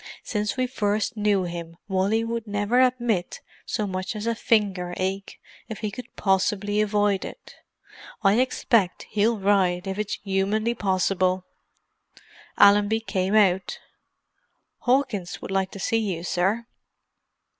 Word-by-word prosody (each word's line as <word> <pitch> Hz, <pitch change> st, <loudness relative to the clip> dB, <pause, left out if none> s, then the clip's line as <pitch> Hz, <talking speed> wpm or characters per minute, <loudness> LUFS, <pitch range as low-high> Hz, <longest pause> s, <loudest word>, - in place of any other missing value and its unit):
"Since 210 Hz, +1 st, -2 dB
we 255 Hz, -, +2 dB
first 215 Hz, -2 st, -1 dB
knew 205 Hz, -3 st, +2 dB
him 170 Hz, -1 st, -6 dB
Wally 200 Hz, +3 st, +1 dB
would 230 Hz, 0 st, -4 dB
never 205 Hz, +4 st, +2 dB
admit 240 Hz, -8 st, 0 dB, 0.3 s
so 215 Hz, -, -1 dB
much 185 Hz, +2 st, -4 dB
as 210 Hz, +1 st, -4 dB
a 230 Hz, -, +1 dB
finger 195 Hz, -6 st, 0 dB
ache 190 Hz, +1 st, -3 dB, 0.3 s
if 220 Hz, -, -6 dB
he 215 Hz, -, -2 dB
could 250 Hz, +4 st, -10 dB
possibly 205 Hz, +1 st, +1 dB
avoid 205 Hz, -2 st, +1 dB
it. -, -, -10 dB, 0.7 s
I 200 Hz, +3 st, +4 dB
expect 230 Hz, -6 st, +1 dB
he'll 215 Hz, +2 st, +2 dB
ride 190 Hz, -2 st, +2 dB
if 195 Hz, +1 st, -4 dB
it's 210 Hz, -1 st, -2 dB
humanly 205 Hz, +4 st, 0 dB
possible!" 185 Hz, -2 st, 0 dB, 1.1 s
Allenby 205 Hz, +2 st, +5 dB
came 195 Hz, -2 st, -1 dB
out. 190 Hz, -3 st, +3 dB, 1.0 s
"Hawkins 245 Hz, -8 st, 0 dB
would -, -, -7 dB
like 190 Hz, -1 st, 0 dB
to 195 Hz, -, -10 dB
see 225 Hz, +4 st, +1 dB
you, 190 Hz, -6 st, -3 dB
sir." 195 Hz, +6 st, 0 dB
205 Hz, 135 wpm, -25 LUFS, 190-220 Hz, 1.1 s, Allenby